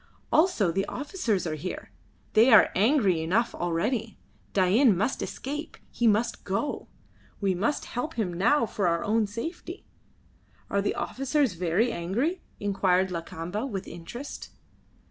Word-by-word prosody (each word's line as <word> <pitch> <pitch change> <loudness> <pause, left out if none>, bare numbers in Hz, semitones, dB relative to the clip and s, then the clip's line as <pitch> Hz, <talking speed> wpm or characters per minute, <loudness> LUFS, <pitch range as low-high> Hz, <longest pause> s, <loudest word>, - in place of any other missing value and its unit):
Also 310 - +3
the 195 +3 -1
officers 255 - -2
are 160 - -2
here. 165 +4 -6 0.4
They 230 +4 +6
are 220 - +7
angry 200 - +3
enough 205 +9 +1
already. 210 +7 -1 0.3
Dain 200 +3 +4
must 210 +8 0
escape; 295 +4 -5
he 240 - +1
must 225 +3 +1
go. 200 +10 -2 0.5
We 195 -2 +1
must 225 +11 -1
help 250 +7 -4
him 200 -6 -1
now 230 +10 +3
for 200 -3 -1
our 170 0 +1
own 215 0 +1
safety." 330 - -6 0.9
"Are 200 - +2
the 205 - -1
officers 270 +1 0
very 180 +7 +1
angry?" 235 - -1 0.2
inquired 190 -2 +1
Lakamba, 175 +6 -4
with 195 -5 -5
interest. 205 +12 -8
210 Hz, 135 wpm, -27 LUFS, 185-255 Hz, 0.9 s, are